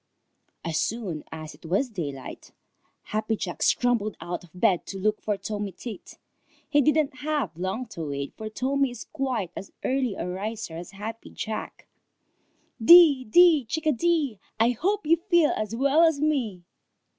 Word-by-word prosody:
As 160 -2 0
soon 200 -9 -3
as 155 -1 -7
it - - -19
was 190 +11 0
daylight, 145 - -7 0.5
Happy 215 +1 -1
Jack 180 -4 -5
scrambled 235 -4 +2
out 175 +1 -5
of 175 - -16
bed 180 0 +1
to 195 - -6
look 210 +2 0
for 210 -2 -1
Tommy 205 -1 -4
Tit. 210 +2 -9 0.5
He 290 - +3
didn't 300 -1 +2
have 295 - -2
long 190 +8 -3
to 165 -7 -5
wait, 140 0 -4
for 220 -1 -6
Tommy 270 +4 0
is 240 -2 -8
quite 255 - -3
as 195 - -8
early 255 -5 0
a - - -4
riser 200 0 -4
as 170 +1 -7
Happy 215 +3 -7
Jack. 220 -1 -6 1.0
"Dee, 310 -3 +8
dee, 325 +4 +6
chickadee! 305 - 0 0.2
I 230 +2 +4
hope 390 - -1
you 330 +2 +4
feel 345 -3 +3
as 215 +1 -3
well 280 +5 +3
as 320 -3 +4
me!" 255 -12 0
225 Hz, 155 wpm, -26 LUFS, 190-285 Hz, 1.0 s, Dee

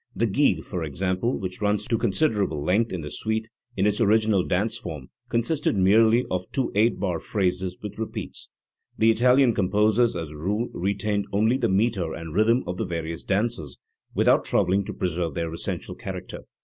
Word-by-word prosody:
The 110 +5 +1
gigue, 135 +7 +2
for 90 -4 -4
example, 95 - -1
which 95 +1 -6
runs 105 0 0
to 115 - +1
considerable 100 - 0
length 105 +8 +1
in 90 - -3
the 75 -1 -7
suite, 110 +5 -2 0.3
in 95 - +2
its 105 +2 +1
original 110 -3 +3
dance* 105 +6 0
form 80 - -7 0.2
consisted 120 +4 +1
merely 110 +5 +4
of 90 0 -3
two 135 - -1
eight 110 +2 +2
bar 90 -4 -1
phrases 90 -2 -1
with 105 0 -7
repeats* 110 - -5 0.5
The 115 +1 +5
Italian 125 +2 +4
composers 105 +4 +2
as 80 -3 -4
a - - -10
rule 105 +10 -2
retained 100 +2 -1
only 110 +5 +2
the 120 -4 0
metre 95 -4 +1
and 80 -1 -7
rhythm 115 +6 +3
of 90 +1 -4
the - - -1
various 85 -1 -4
dances, 100 - -1 0.4
without - - +4
troubling 95 +2 +1
to - - -5
preserve 85 -4 -2
their 85 -1 -2
essential 85 - -4
character. - - -7
100 Hz, 175 wpm, -25 LUFS, 90-115 Hz, 0.5 s, The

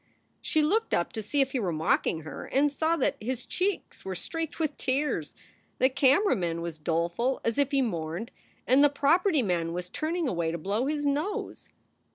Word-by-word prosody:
She 310 - +1
looked 435 +9 +2
up 170 - -1
to 220 - -3
see 280 +7 0
if 270 0 +1
he 260 - -1
were 190 -6 -1
mocking 160 0 +1
her, 155 -2 -7
and 285 +2 +2
saw 320 +3 +1
that 300 - 0
his 245 +2 -3
cheeks 385 +1 -2
were 190 -1 -4
streaked 325 - -5
with 310 -3 0
tears. 280 +3 -1 0.4
The 260 - +4
camera 280 +9 +4
man 170 -2 -2
was 165 -2 -5
doleful 170 - 0
as 230 +3 0
if 285 -1 +3
he 275 -1 +2
mourned, 170 0 -3 0.3
and 260 +4 +5
the 290 - +7
property 305 +2 +3
man 170 -4 0
was 180 0 -4
turning 325 - -1
away 170 -7 0
to 170 - -3
blow 205 - -1
his 295 0 -1
nose. 315 +11 -2
260 Hz, 195 wpm, -28 LUFS, -, 0.4 s, the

